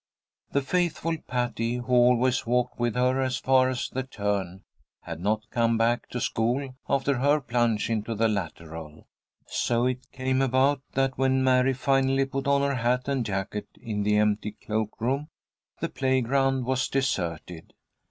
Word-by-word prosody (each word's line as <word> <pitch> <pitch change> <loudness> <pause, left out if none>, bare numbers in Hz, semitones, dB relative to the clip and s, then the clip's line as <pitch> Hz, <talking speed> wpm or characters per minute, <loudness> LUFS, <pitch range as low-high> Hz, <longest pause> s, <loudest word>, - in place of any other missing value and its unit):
The 140 - +1
faithful 165 0 0
Patty, 120 -1 -1
who 125 +1 -3
always 125 0 +4
walked 125 +1 0
with 120 -1 0
her 130 +1 +2
as 130 -2 0
far 130 -1 +3
as 130 -1 -2
the 130 - -3
turn, 100 -7 -3 0.4
had - - -6
not 110 +3 -1
come 115 -1 +2
back 115 +1 +1
to 125 - -4
school 125 +4 -1 0.2
after 140 -1 +1
her 145 +3 +3
plunge 120 -4 0
into 115 0 -2
the 115 +2 +2
lateral. 80 -6 -5 0.4
So 120 0 0
it 130 0 -2
came 130 0 0
about 135 +1 +2
that 135 -1 0
when 130 0 +2
Mary 130 0 +4
finally 135 +1 +2
put 135 +1 -4
on 140 0 +3
her 140 0 +1
hat 125 +1 0
and 135 -3 0
jacket 100 0 -3
in 105 -2 -3
the 105 +1 +2
empty 105 0 +1
cloak 110 0 -3
room, 135 +6 -1 0.5
the 165 - -1
playground 135 -1 +1
was 130 0 0
deserted. 85 - -2
125 Hz, 160 wpm, -26 LUFS, 110-135 Hz, 0.5 s, always